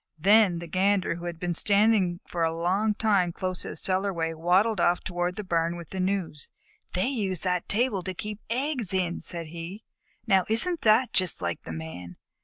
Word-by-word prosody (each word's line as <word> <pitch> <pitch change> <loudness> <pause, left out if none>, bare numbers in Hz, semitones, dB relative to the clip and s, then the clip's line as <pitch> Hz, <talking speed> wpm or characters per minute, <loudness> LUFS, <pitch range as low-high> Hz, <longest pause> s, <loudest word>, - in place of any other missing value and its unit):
Then 195 +1 +5
the 170 - -6
Gander, 185 +1 +1
who 175 - -8
had 170 -2 -5
been 175 0 -2
standing 200 -2 +3
for 170 - -4
a 165 0 0
long 195 +5 +1
time 200 -5 +2
close 185 +1 -3
to - - -3
the - - -6
cellarway, 185 -4 -1
waddled 180 +6 +2
off 175 +1 +2
toward 175 0 -2
the 210 - -5
barn 170 -2 0
with 170 -2 -9
the 190 - -4
news. 185 -5 -2 0.4
"They 180 - +1
use 205 - 0
that 180 -2 -1
table 215 -2 +1
to 185 +1 -5
keep 210 +3 -6
eggs 250 -5 -1
in," 175 -2 0
said 170 -3 -6
he. 170 +6 -8 0.4
"Now 195 -5 +3
isn't 320 +10 +1
that 225 +3 +4
just 185 -2 0
like 85 -1 -3
the - - -8
Man? 85 +2 -8
185 Hz, 195 wpm, -27 LUFS, 170-205 Hz, 0.4 s, Then